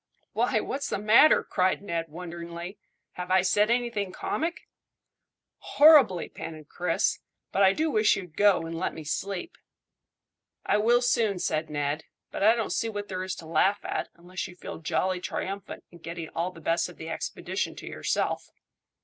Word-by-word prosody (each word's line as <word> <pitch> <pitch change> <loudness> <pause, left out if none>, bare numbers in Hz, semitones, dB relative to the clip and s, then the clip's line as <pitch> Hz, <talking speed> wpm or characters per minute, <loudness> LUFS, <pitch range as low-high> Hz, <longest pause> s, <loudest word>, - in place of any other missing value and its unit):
"Why, - - +2
what's 280 +1 -3
the - - -1
matter?" 215 +9 +6
cried 185 +1 0
Ned 170 -4 -3
wonderingly. 170 +3 -7 0.3
"Have 180 0 -7
I 185 0 +4
said 205 +3 +3
anything 235 -5 0
comic?" 330 - -3 0.9
"Horribly," 280 - +6
panted 155 -2 -9
Chris; 180 +3 0 0.3
"but 195 - +1
I 190 -1 +6
do 315 +7 0
wish 215 -3 +4
you'd 180 -5 -8
go, 205 -3 +4
and 165 0 -5
let 165 - -2
me 160 - -7
sleep." 195 - -4 1.1
"I - - +3
will 240 +3 +4
soon," 225 -5 +2
said 155 -2 -1
Ned; 145 +1 -2 0.3
"but - - -5
I 220 +3 +6
don't 225 -2 -2
see 230 - 0
what 205 -1 -5
there 185 -1 -3
is 185 -1 -3
to 165 - -10
laugh 185 +6 +1
at, - - -2
unless 180 +2 -6
you 180 - -13
feel 180 - -8
jolly 185 +3 0
triumphant 195 +2 -5
at 170 - -14
getting 165 -1 -6
all 170 +2 -2
the 170 -2 -13
best 165 +2 +1
of 175 - -13
the 160 - -7
expedition - - -3
to - - -9
yourself." - - -2
185 Hz, 175 wpm, -27 LUFS, 170-210 Hz, 1.1 s, matter